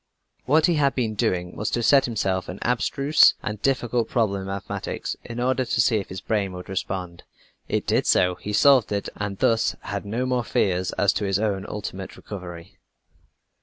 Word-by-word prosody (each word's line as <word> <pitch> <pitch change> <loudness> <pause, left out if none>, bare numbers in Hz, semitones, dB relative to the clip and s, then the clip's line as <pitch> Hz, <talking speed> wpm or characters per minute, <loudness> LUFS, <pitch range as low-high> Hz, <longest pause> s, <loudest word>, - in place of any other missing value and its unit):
What 155 +4 +4
he 170 -3 +2
had 140 -2 +2
been 115 -4 -1
doing 90 -5 -1
was 105 - -2
to 120 - -1
set 135 +2 +5
himself 95 -6 -1
an 90 - -6
abstruse 140 +4 +4
and 105 0 -4
difficult 120 -4 0
problem 100 -5 0
in 95 - -7
mathematics, 95 0 -4
in 120 0 -7
order 130 +1 +1
to 120 - -2
see 115 -1 +4
if 100 - -4
his 95 0 -6
brain 100 -4 -1
would 90 0 -9
respond. 90 -2 -4 0.5
It - - -1
did - - +1
so, 90 0 +4
he 100 +3 -7
solved 130 +2 +5
it 100 -1 -2
and 100 -2 -4
thus 115 +2 +2
had 100 -1 -4
no 115 +5 -2
more 125 -1 0
fears 95 -4 0
as 100 -2 +2
to 105 - -2
his 95 -1 +1
own 100 -2 -1
ultimate 95 -2 -6
recovery. 90 -2 -9
105 Hz, 190 wpm, -24 LUFS, 95-120 Hz, 0.5 s, set